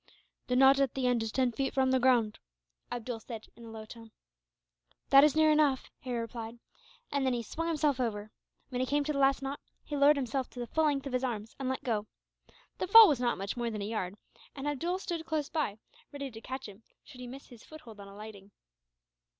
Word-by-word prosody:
"The 250 Hz, -, 0 dB
knot 270 Hz, +1 st, +6 dB
at 275 Hz, -3 st, +1 dB
the 265 Hz, -1 st, -1 dB
end 245 Hz, -2 st, +2 dB
is 225 Hz, -1 st, -3 dB
ten 255 Hz, 0 st, +1 dB
feet 270 Hz, +4 st, -2 dB
from 265 Hz, -1 st, +3 dB
the 260 Hz, -, +3 dB
ground," 240 Hz, -4 st, +2 dB, 0.5 s
Abdool 240 Hz, -1 st, -4 dB
said, 225 Hz, -1 st, -8 dB
in 235 Hz, -, -13 dB
a -, -, -10 dB
low 220 Hz, -1 st, -8 dB
tone. 225 Hz, 0 st, -12 dB, 1.0 s
"That 275 Hz, 0 st, +9 dB
is 300 Hz, -1 st, +4 dB
near 315 Hz, 0 st, +5 dB
enough," 295 Hz, -4 st, +2 dB
Harry 250 Hz, -2 st, -4 dB
replied, 230 Hz, 0 st, -6 dB, 0.5 s
and 280 Hz, -1 st, 0 dB
then 260 Hz, -1 st, +2 dB
he 235 Hz, -, -3 dB
swung 330 Hz, +9 st, -4 dB
himself 300 Hz, -4 st, +1 dB
over. 215 Hz, -3 st, -2 dB, 0.4 s
When 250 Hz, -1 st, -2 dB
he 255 Hz, -, 0 dB
came 290 Hz, +2 st, +1 dB
to 300 Hz, +1 st, -2 dB
the 280 Hz, -, -2 dB
last 275 Hz, 0 st, +3 dB
knot, 275 Hz, +1 st, -4 dB, 0.2 s
he 295 Hz, -, -5 dB
lowered 285 Hz, +1 st, +6 dB
himself 260 Hz, -1 st, -2 dB
to 245 Hz, -, -11 dB
the 240 Hz, -, -3 dB
full 315 Hz, +7 st, +1 dB
length 285 Hz, -2 st, 0 dB
of 275 Hz, -, -5 dB
his 255 Hz, +1 st, 0 dB
arms 225 Hz, -4 st, -4 dB
and 265 Hz, -1 st, -2 dB
let 260 Hz, -, -3 dB
go. 215 Hz, -3 st, -1 dB, 0.7 s
The 370 Hz, -, -1 dB
fall 450 Hz, +3 st, +10 dB
was 285 Hz, -6 st, +2 dB
not 240 Hz, -1 st, 0 dB
much 195 Hz, +1 st, -4 dB
more 240 Hz, -1 st, -2 dB
than 210 Hz, -2 st, -4 dB
a -, -, -3 dB
yard; 205 Hz, -3 st, -3 dB, 0.4 s
and 280 Hz, +1 st, -5 dB
Abdool 335 Hz, +6 st, -1 dB
stood 345 Hz, -4 st, -4 dB
close 305 Hz, -3 st, -1 dB
by, 290 Hz, -11 st, -2 dB, 0.3 s
ready 280 Hz, -2 st, -6 dB
to 225 Hz, -1 st, -10 dB
catch 260 Hz, +2 st, -6 dB
him, 205 Hz, +1 st, -13 dB, 0.2 s
should 255 Hz, -4 st, -13 dB
he 250 Hz, -, -7 dB
miss 270 Hz, +3 st, -10 dB
his 240 Hz, -3 st, -14 dB
foothold 245 Hz, -9 st, -13 dB
on 200 Hz, -, -10 dB
alighting. 200 Hz, 0 st, -11 dB
255 Hz, 230 wpm, -31 LUFS, 225-280 Hz, 1.0 s, fall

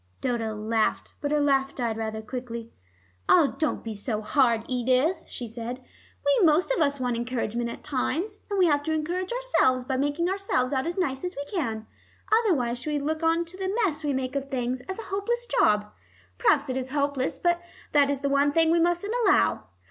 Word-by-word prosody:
Dodo 225 Hz, -3 st, -1 dB
laughed, 220 Hz, +1 st, -1 dB
but 290 Hz, -, -1 dB
her 300 Hz, 0 st, +2 dB
laugh 275 Hz, -1 st, +2 dB
died 235 Hz, -3 st, -1 dB
rather 220 Hz, 0 st, -4 dB
quickly. 235 Hz, -1 st, -6 dB, 0.6 s
"Ah, 325 Hz, -6 st, +5 dB
don't 310 Hz, -, 0 dB
be 225 Hz, -, -4 dB
hard, 225 Hz, +2 st, +1 dB
Edith," 255 Hz, +7 st, +1 dB
she 240 Hz, -, -5 dB
said. 235 Hz, +2 st, -6 dB, 0.5 s
"We 285 Hz, +7 st, +4 dB
most 330 Hz, +7 st, +4 dB
of 440 Hz, -, +1 dB
us 280 Hz, -2 st, +1 dB
want 250 Hz, -2 st, 0 dB
encouragement 235 Hz, -1 st, -2 dB
at -, -, -8 dB
times, 325 Hz, +9 st, -2 dB
and 405 Hz, -, -1 dB
we 370 Hz, -, +5 dB
have 290 Hz, -3 st, +3 dB
to 315 Hz, -, 0 dB
encourage 350 Hz, +5 st, -2 dB
ourselves 480 Hz, -, +2 dB
by 260 Hz, 0 st, -1 dB
making 290 Hz, +5 st, 0 dB
ourselves 370 Hz, -9 st, 0 dB
out 265 Hz, +3 st, 0 dB
as 345 Hz, -, -3 dB
nice 270 Hz, -7 st, -1 dB
as 360 Hz, 0 st, -4 dB
we 285 Hz, -, -4 dB
can. 230 Hz, -, -3 dB, 0.6 s
Otherwise 250 Hz, -, 0 dB
we 305 Hz, -, -2 dB
should 285 Hz, -, -1 dB
look 315 Hz, +1 st, -1 dB
on 330 Hz, +1 st, +2 dB
the 375 Hz, +4 st, -4 dB
mess 310 Hz, -4 st, -2 dB
we 295 Hz, -, 0 dB
make 260 Hz, 0 st, -2 dB
of 275 Hz, 0 st, -2 dB
things 250 Hz, -1 st, -2 dB
as 380 Hz, -, -3 dB
a 455 Hz, -, -6 dB
hopeless 475 Hz, +5 st, -1 dB
job. 210 Hz, -, +2 dB, 0.5 s
Perhaps 290 Hz, -1 st, +3 dB
it 260 Hz, 0 st, -2 dB
is 260 Hz, 0 st, -3 dB
hopeless 280 Hz, -2 st, -1 dB
but 345 Hz, 0 st, +1 dB, 0.3 s
that 285 Hz, -2 st, +4 dB
is 280 Hz, -1 st, -1 dB
the 280 Hz, -, 0 dB
one 280 Hz, +1 st, +3 dB
thing 325 Hz, +1 st, +3 dB
we 340 Hz, -, +4 dB
mustn't 350 Hz, +5 st, +1 dB
allow. 105 Hz, 0 st, +3 dB
280 Hz, 200 wpm, -26 LUFS, 245-335 Hz, 0.6 s, Ah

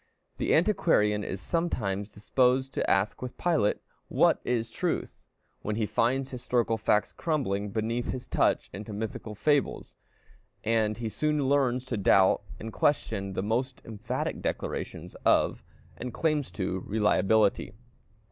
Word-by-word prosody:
The -, -, +2 dB
antiquarian 155 Hz, -, +3 dB
is 95 Hz, -, -4 dB
sometimes 105 Hz, -, -1 dB
disposed 130 Hz, +5 st, +1 dB
to -, -, -1 dB
ask 95 Hz, +2 st, +1 dB
with 125 Hz, -1 st, -6 dB
Pilate, 160 Hz, -12 st, +2 dB, 0.3 s
"What -, -, +3 dB
is 115 Hz, -2 st, -1 dB
truth?" -, -, -3 dB, 0.4 s
when 105 Hz, -, -2 dB
he 110 Hz, 0 st, 0 dB
finds 130 Hz, +5 st, 0 dB
historical 120 Hz, -2 st, 0 dB
facts 105 Hz, -1 st, +1 dB
crumbling 105 Hz, -, -1 dB
beneath 115 Hz, +3 st, -2 dB
his 130 Hz, -1 st, -4 dB
touch -, -, +1 dB
into 105 Hz, +3 st, -7 dB
mythological 110 Hz, 0 st, -5 dB
fables; 145 Hz, +5 st, 0 dB, 0.7 s
and 110 Hz, -1 st, +1 dB
he 115 Hz, -1 st, -3 dB
soon 150 Hz, +4 st, 0 dB
learns 130 Hz, -3 st, +2 dB
to 125 Hz, -3 st, -3 dB
doubt 95 Hz, -1 st, +4 dB, 0.2 s
and 110 Hz, 0 st, -7 dB
question 100 Hz, -9 st, 0 dB
the 95 Hz, -, -2 dB
most 125 Hz, +5 st, -1 dB
emphatic 110 Hz, -3 st, -3 dB
declarations -, -, -4 dB
of, -, -, +3 dB, 0.4 s
and 125 Hz, -, -5 dB
claims 155 Hz, -4 st, 0 dB
to, 95 Hz, -2 st, -2 dB
reliability. 105 Hz, -1 st, +2 dB
115 Hz, 135 wpm, -28 LUFS, 105-130 Hz, 0.7 s, doubt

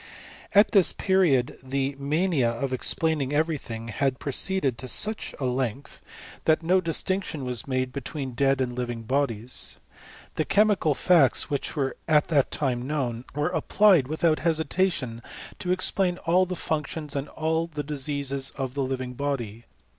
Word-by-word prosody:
At 205 Hz, +2 st, +6 dB
this 195 Hz, -5 st, +5 dB
period 175 Hz, -11 st, +2 dB
the 135 Hz, +1 st, -2 dB
mania 150 Hz, -2 st, +1 dB
of 130 Hz, +3 st, -3 dB
explaining 145 Hz, +1 st, 0 dB
every 155 Hz, 0 st, +1 dB
thing 115 Hz, -1 st, -7 dB
had 130 Hz, +4 st, 0 dB
proceeded 140 Hz, -2 st, -1 dB
to 130 Hz, -, -5 dB
such 215 Hz, -, -1 dB
a 135 Hz, -, -2 dB
length, 125 Hz, +1 st, -3 dB, 0.4 s
that 160 Hz, +1 st, +3 dB
no 185 Hz, +3 st, +3 dB
distinctioa 170 Hz, -2 st, -1 dB
was 125 Hz, -2 st, -3 dB
made 130 Hz, -1 st, -1 dB
between 140 Hz, 0 st, -5 dB
dead 135 Hz, +2 st, +1 dB
and 125 Hz, -1 st, -1 dB
living 120 Hz, -2 st, -4 dB
bodies. 125 Hz, -2 st, 0 dB, 0.6 s
The 155 Hz, -, +2 dB
che^ 210 Hz, +1 st, +4 dB
mical 155 Hz, -6 st, 0 dB
facts 160 Hz, -4 st, +3 dB
which 140 Hz, -, -2 dB
were 135 Hz, -3 st, -1 dB
at 150 Hz, -2 st, +3 dB
that 145 Hz, -5 st, +3 dB
time 125 Hz, -3 st, -1 dB
known, 130 Hz, -5 st, -2 dB
were 155 Hz, +5 st, -1 dB
ap 160 Hz, -, -2 dB
plied 190 Hz, -10 st, +5 dB
without 155 Hz, +1 st, +1 dB
hesitation 160 Hz, -6 st, 0 dB, 0.4 s
to 180 Hz, -, -2 dB
explain 185 Hz, 0 st, +1 dB
all 180 Hz, +2 st, +3 dB
the 180 Hz, -, -3 dB
functions 150 Hz, -2 st, -3 dB
and 140 Hz, +1 st, -3 dB
all 160 Hz, +1 st, -1 dB
the 150 Hz, -3 st, -5 dB
diseases 140 Hz, -2 st, -2 dB
of 130 Hz, -2 st, -3 dB
the 140 Hz, -, -2 dB
living 130 Hz, -1 st, -3 dB
body. 120 Hz, -5 st, -4 dB
140 Hz, 160 wpm, -26 LUFS, 130-160 Hz, 0.6 s, At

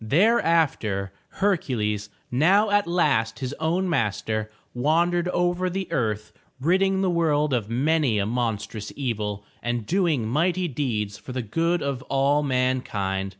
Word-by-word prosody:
Thereafter, 145 Hz, -, +2 dB, 0.2 s
Hercules, 115 Hz, -, -1 dB, 0.2 s
now 190 Hz, -, +4 dB
at 205 Hz, -3 st, +3 dB
last 145 Hz, -11 st, +1 dB
his 130 Hz, 0 st, -4 dB
own 170 Hz, +4 st, 0 dB
master, 110 Hz, -, -1 dB, 0.2 s
wandered 170 Hz, +7 st, +1 dB
over 175 Hz, 0 st, 0 dB
the 190 Hz, 0 st, -3 dB
earth 110 Hz, -2 st, -1 dB, 0.3 s
ridding 190 Hz, +6 st, +2 dB
the 190 Hz, -, +2 dB
world 150 Hz, -4 st, +1 dB
of 115 Hz, -4 st, -1 dB
many 135 Hz, -1 st, +2 dB
a 100 Hz, -, +1 dB
monstrous 110 Hz, -2 st, -3 dB
evil 105 Hz, -6 st, -3 dB, 0.2 s
and 120 Hz, -2 st, -2 dB
doing 160 Hz, -, +1 dB
mighty 175 Hz, +8 st, +1 dB
deeds 110 Hz, -8 st, -2 dB
for 125 Hz, -, -9 dB
the 130 Hz, -1 st, -2 dB
good 165 Hz, +10 st, 0 dB
of 140 Hz, -2 st, -2 dB
all 140 Hz, +2 st, +2 dB
mankind. 125 Hz, -8 st, -1 dB
135 Hz, 135 wpm, -24 LUFS, 110-170 Hz, 0.3 s, now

